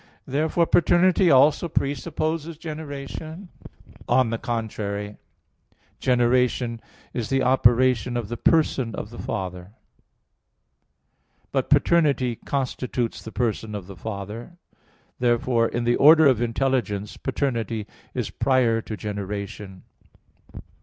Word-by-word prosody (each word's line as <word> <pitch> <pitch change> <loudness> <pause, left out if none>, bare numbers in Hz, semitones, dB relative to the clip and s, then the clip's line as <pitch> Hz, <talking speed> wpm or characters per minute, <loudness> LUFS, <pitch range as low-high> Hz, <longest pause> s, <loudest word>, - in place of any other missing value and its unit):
Therefore 160 +4 +1
paternity 175 +2 +4
also 145 +5 +5
presupposes 155 +3 -2
generation. 155 +2 -7 0.6
On 130 -3 +3
the 115 - -2
contrary, 105 -3 -4 0.8
Generation 125 -1 +1 0.3
is 115 -3 -3
the 135 -1 +1
operation 125 -1 +3
of 115 -4 -3
the 120 - -4
person 130 -5 +1
of 105 - -6
the 120 - -10
Father. 95 -2 -5 1.8
But - - -1
paternity 140 -8 +3
constitutes 125 -3 -3
the 110 - -9
person 110 -3 -2
of 100 -3 -6
the 100 +1 -10
Father. 110 - -7 0.6
Therefore 120 -1 +2
in 120 +1 -3
the 120 0 +2
order 155 +2 +7
of 130 -5 +4
intelligence, 115 -4 -1
paternity 115 -6 -2 0.3
is - - -2
prior 125 -4 +2
to 110 -1 -7
generation. 100 -1 -6
120 Hz, 105 wpm, -24 LUFS, 110-140 Hz, 1.8 s, order